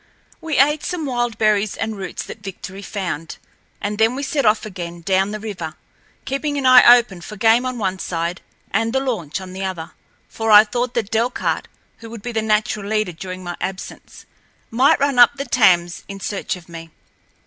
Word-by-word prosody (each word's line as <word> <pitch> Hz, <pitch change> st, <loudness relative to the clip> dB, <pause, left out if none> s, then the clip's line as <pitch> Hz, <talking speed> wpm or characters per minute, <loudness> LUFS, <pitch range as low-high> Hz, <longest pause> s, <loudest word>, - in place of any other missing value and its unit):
We 320 Hz, -2 st, -2 dB
ate 295 Hz, +3 st, +3 dB
some 355 Hz, -4 st, -3 dB
wild 240 Hz, -3 st, -1 dB
berries 215 Hz, -1 st, +1 dB
and 220 Hz, -1 st, -3 dB
roots 195 Hz, -2 st, -5 dB
that -, -, -9 dB
Victory 195 Hz, -1 st, -8 dB
found, 180 Hz, -6 st, -5 dB, 0.4 s
and 205 Hz, +1 st, -4 dB
then 225 Hz, +3 st, +3 dB
we 280 Hz, -, -4 dB
set 280 Hz, -3 st, 0 dB
off 215 Hz, +1 st, +2 dB
again 175 Hz, -4 st, -7 dB
down 190 Hz, +2 st, +1 dB
the 215 Hz, +1 st, -5 dB
river, 190 Hz, -7 st, -6 dB, 0.5 s
keeping 285 Hz, +2 st, -2 dB
an 275 Hz, -, -2 dB
eye 250 Hz, -1 st, +9 dB
open 195 Hz, -7 st, -4 dB
for 210 Hz, -, -9 dB
game 225 Hz, +4 st, +3 dB
on 255 Hz, -1 st, -4 dB
one 190 Hz, -4 st, -2 dB
side 170 Hz, 0 st, -3 dB, 0.3 s
and 225 Hz, +1 st, 0 dB
the 265 Hz, -, +2 dB
launch 215 Hz, -, -3 dB
on 185 Hz, -1 st, -9 dB
the 190 Hz, +1 st, -5 dB
other, 175 Hz, -3 st, -5 dB, 0.4 s
for 225 Hz, 0 st, -4 dB
I 210 Hz, 0 st, +9 dB
thought 245 Hz, +3 st, -3 dB
that 225 Hz, -4 st, -2 dB
Delcarte, 235 Hz, +3 st, -1 dB, 0.3 s
who 225 Hz, 0 st, -10 dB
would 225 Hz, -2 st, -9 dB
be 245 Hz, -, -4 dB
the 225 Hz, -1 st, -1 dB
natural 215 Hz, -1 st, 0 dB
leader 215 Hz, -3 st, 0 dB
during 185 Hz, +2 st, -8 dB
my 175 Hz, -1 st, -5 dB
absence, 190 Hz, 0 st, -7 dB, 0.5 s
might 255 Hz, +5 st, +4 dB
run 280 Hz, -2 st, +1 dB
up 245 Hz, +3 st, +7 dB
the 275 Hz, 0 st, -4 dB
Thames 175 Hz, -9 st, +3 dB
in 195 Hz, 0 st, -8 dB
search 195 Hz, 0 st, -3 dB
of 180 Hz, -2 st, -14 dB
me. 165 Hz, -1 st, -10 dB
215 Hz, 195 wpm, -20 LUFS, 185-240 Hz, 0.5 s, eye